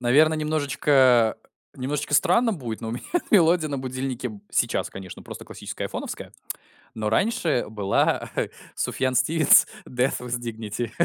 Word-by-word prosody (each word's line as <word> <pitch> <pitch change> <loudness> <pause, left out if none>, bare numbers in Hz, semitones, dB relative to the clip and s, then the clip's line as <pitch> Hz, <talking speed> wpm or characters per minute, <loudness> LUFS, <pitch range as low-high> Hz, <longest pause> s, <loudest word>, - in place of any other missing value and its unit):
Наверно, 150 +6 +4
немножечко 140 -6 +3 0.4
немножечко 145 +3 -2
странно 225 - +4
будет, 120 -8 -6
но 115 - -5
у - - -3
меня 120 - -6 0.3
мелодия 170 -5 +4
на 140 - -2
будильнике 130 - -4
сейчас, 120 - 0
конечно, 95 -2 -9
просто - - -9
классическая - - -6
айфоновская, - - -6 0.6
но 110 -1 -2
раньше 170 - +1
была 105 -3 0 0.5
Суфьян 130 -1 -1
Стивенс 155 +4 +5 0.2
"Death 125 +2 0
with 125 0 -3
dignity". 115 0 -4
130 Hz, 130 wpm, -24 LUFS, 120-155 Hz, 0.6 s, Стивенс